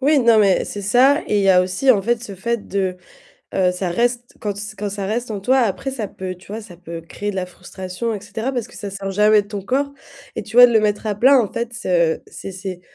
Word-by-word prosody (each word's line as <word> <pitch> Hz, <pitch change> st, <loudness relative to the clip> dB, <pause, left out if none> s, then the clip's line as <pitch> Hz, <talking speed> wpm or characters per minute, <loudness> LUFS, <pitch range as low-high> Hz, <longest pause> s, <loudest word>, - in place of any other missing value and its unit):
Oui, 290 Hz, +2 st, +4 dB
non 235 Hz, -3 st, +5 dB
mais 195 Hz, -3 st, +3 dB
c'est 205 Hz, -, -6 dB
ça 260 Hz, +9 st, +4 dB
et 210 Hz, -, +2 dB
il -, -, +2 dB
y 195 Hz, -, +3 dB
a 180 Hz, -1 st, +6 dB
aussi 185 Hz, +9 st, +2 dB
en 205 Hz, -6 st, +4 dB
fait 235 Hz, +1 st, 0 dB
ce 205 Hz, -5 st, -7 dB
fait 235 Hz, +4 st, -3 dB
de, 190 Hz, -2 st, -1 dB, 0.6 s
heu, 185 Hz, -1 st, +2 dB
ça 180 Hz, 0 st, -3 dB
reste 240 Hz, +5 st, -1 dB
quand 205 Hz, -2 st, -3 dB
se 210 Hz, +1 st, -7 dB
quand 205 Hz, 0 st, -3 dB
ça 200 Hz, -1 st, -4 dB
reste 230 Hz, +4 st, -2 dB
en 210 Hz, -2 st, -3 dB
toi, 260 Hz, +7 st, +3 dB
après 240 Hz, +4 st, -1 dB
ça 230 Hz, -6 st, -4 dB
peut, 185 Hz, -1 st, -6 dB
tu 180 Hz, -, -19 dB
vois, 220 Hz, +2 st, -5 dB
ça 200 Hz, -5 st, -12 dB
peut 170 Hz, -2 st, -8 dB
créer 205 Hz, +5 st, -5 dB
de 200 Hz, -, -4 dB
la 185 Hz, -1 st, -1 dB
frustration, 185 Hz, +4 st, -6 dB, 0.4 s
parce 245 Hz, -4 st, -3 dB
que -, -, -16 dB
ça 205 Hz, -, -6 dB
sert 195 Hz, 0 st, -5 dB
jamais 210 Hz, +1 st, +4 dB
de -, -, -19 dB
ton 205 Hz, -1 st, -5 dB
corps 275 Hz, +7 st, -1 dB, 0.4 s
et -, -, -2 dB
tu 220 Hz, -, -10 dB
vois, 245 Hz, -, +11 dB
de 245 Hz, -, +1 dB
le 220 Hz, -, +6 dB
mettre 210 Hz, 0 st, 0 dB
à 210 Hz, -, 0 dB
plat 260 Hz, +6 st, +6 dB
en 220 Hz, -5 st, -1 dB
fait, 235 Hz, 0 st, -3 dB
c'est 170 Hz, -6 st, +1 dB
c'est 195 Hz, -, -8 dB
c'est 185 Hz, -1 st, -7 dB
205 Hz, 265 wpm, -20 LUFS, 190-235 Hz, 0.6 s, vois